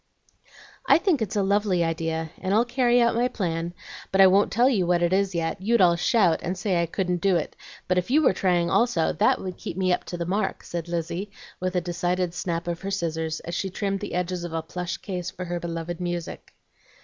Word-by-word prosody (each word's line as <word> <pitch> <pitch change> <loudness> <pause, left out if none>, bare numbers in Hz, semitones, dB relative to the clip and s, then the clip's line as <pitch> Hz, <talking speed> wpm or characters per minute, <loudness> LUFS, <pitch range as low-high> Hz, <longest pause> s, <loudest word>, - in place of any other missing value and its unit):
"I - - +8
think 340 - +1
it's 215 -2 -2
a 205 - +2
lovely 200 -3 +2
idea, 165 -1 -2
and 190 +2 0
I'll 230 +2 +4
carry 245 0 +2
out 235 -1 +3
my 240 +2 +2
plan. 170 -7 -3 0.4
But 190 - +1
I 195 - +9
won't 195 +2 +4
tell 240 +4 +4 0.2
what 175 -1 +2
it 175 +1 +2
is 195 -1 +1
yet; 165 +1 -2
you'd 230 +4 +2
all 175 -2 +5
shout, 175 -2 +3
and 180 +2 -3
say 185 -2 0
I 170 - 0
couldn't 180 0 -2
do 195 -1 +3
it, 165 - -2 0.3
but 180 0 +3
if 180 - -5
you 305 +5 +4
were 260 - +4
trying 175 -2 +1
also, 180 -3 +2
that - - +2
would 185 -1 -6
keep 175 - -6
me 185 -1 +2
up - - -1
to 175 - -5
the 170 - -3
mark," 195 +5 -1
said 170 -1 -5
Lizzie, 175 +3 -3 0.3
with 185 0 -2
a 180 - +2
decided 175 0 -1
snap 175 -1 -3
of 170 -1 -3
her 195 - -4
scissors, 160 -4 -2
as 170 - -7
she 190 +2 -2
trimmed 195 +1 -2
the - - -5
edges 180 0 -2
of 175 -2 -6
a 165 -1 -2
plush 175 +2 -4
case 180 -3 -5
for 185 0 -7
her 175 0 -3
beloved 170 +1 -5
music. 175 -1 -5
180 Hz, 230 wpm, -25 LUFS, 170-195 Hz, 0.4 s, I